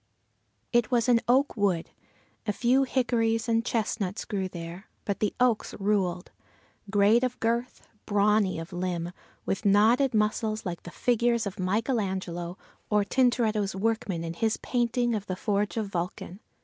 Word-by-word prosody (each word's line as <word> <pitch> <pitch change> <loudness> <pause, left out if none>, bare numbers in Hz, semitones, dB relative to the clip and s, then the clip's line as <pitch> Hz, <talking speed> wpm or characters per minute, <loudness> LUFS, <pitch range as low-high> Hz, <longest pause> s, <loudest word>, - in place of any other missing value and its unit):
It 240 -2 +3
was 240 -2 +2
an 240 -2 +4
oak 265 +4 +3
wood. 195 -6 0 0.6
A 210 - +1
few 250 +5 +3
hickories 230 -3 +1
and 230 0 +2
chestnuts 215 -4 -2
grew 195 -4 -2
there, 170 +2 -8 0.2
but 200 - -2
the 210 - 0
oaks 245 -3 +1
ruled; 195 -3 0 0.6
great 210 +4 +4
of 250 -1 -1
girth, 235 +2 -2 0.2
brawny 205 -2 +2
of 165 +3 -7
limb, 175 -1 -2 0.3
with 195 - -2
knotted 225 +6 +4
muscles 215 +1 0
like 175 -2 -4
the - - -9
figures 235 +2 +1
of 195 -1 -5
Michael 215 +7 0
Angelo 180 -2 -4 0.3
or 210 -1 +3
Tintoretto's 220 -4 +1
workmen 200 -4 -1
in 165 0 -4
his 220 +5 0
painting 240 -1 0
of 210 -2 -3
the 185 - -2
Forge 205 +2 -1
of 215 -3 -1
Vulcan. 180 +1 -4
210 Hz, 150 wpm, -27 LUFS, 190-235 Hz, 0.6 s, an